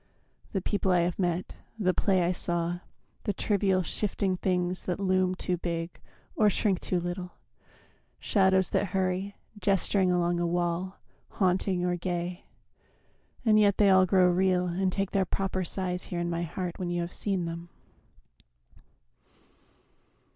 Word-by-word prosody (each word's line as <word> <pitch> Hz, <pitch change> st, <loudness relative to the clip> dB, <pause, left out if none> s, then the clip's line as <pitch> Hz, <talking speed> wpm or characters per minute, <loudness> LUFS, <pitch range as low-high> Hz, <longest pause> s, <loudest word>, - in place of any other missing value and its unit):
The 190 Hz, -3 st, -2 dB
people 200 Hz, -2 st, 0 dB
I 180 Hz, -1 st, +4 dB
have 175 Hz, +1 st, -1 dB
met, 175 Hz, -1 st, -1 dB, 0.2 s
The 185 Hz, -4 st, +2 dB
play 190 Hz, -2 st, +2 dB
I 170 Hz, -, +2 dB
saw, 175 Hz, -1 st, -1 dB, 0.5 s
the 205 Hz, -, 0 dB
trivial, 195 Hz, -2 st, +1 dB
shifting 195 Hz, 0 st, -1 dB
things 180 Hz, 0 st, -1 dB
That 180 Hz, 0 st, -2 dB
loom 185 Hz, -1 st, +2 dB
too 180 Hz, -1 st, -2 dB
big 170 Hz, 0 st, -4 dB, 0.4 s
or 210 Hz, -1 st, +4 dB
shrink 195 Hz, -1 st, +1 dB
too 180 Hz, -, -1 dB
little, 175 Hz, +1 st, -5 dB, 0.9 s
shadows 190 Hz, -2 st, +2 dB
That 200 Hz, -3 st, 0 dB
hurry, 190 Hz, +1 st, -1 dB, 0.2 s
gesturing 195 Hz, -1 st, +2 dB
along 175 Hz, -1 st, +1 dB
a 175 Hz, -, +1 dB
wall, 175 Hz, +2 st, -1 dB, 0.4 s
Haunting 185 Hz, -1 st, +1 dB
or 180 Hz, 0 st, 0 dB
gay 175 Hz, 0 st, -3 dB, 1.0 s
and 215 Hz, -1 st, +5 dB
yet 200 Hz, -2 st, +4 dB
they 200 Hz, -2 st, +5 dB
all 190 Hz, 0 st, +6 dB
grow 185 Hz, -1 st, +5 dB
real 180 Hz, 0 st, +2 dB
And 185 Hz, +2 st, 0 dB
take 195 Hz, +1 st, -2 dB
their 195 Hz, -2 st, +2 dB
proper 190 Hz, +1 st, -2 dB
size 180 Hz, 0 st, -3 dB
here 175 Hz, -, -4 dB
in 175 Hz, 0 st, -1 dB
my 170 Hz, 0 st, -1 dB
heart 175 Hz, +1 st, -4 dB
When 180 Hz, -2 st, -2 dB
you 175 Hz, 0 st, -1 dB
have 170 Hz, +1 st, -5 dB
seen 190 Hz, -4 st, -1 dB
them. 170 Hz, +1 st, -6 dB
185 Hz, 150 wpm, -28 LUFS, 175-190 Hz, 1.0 s, all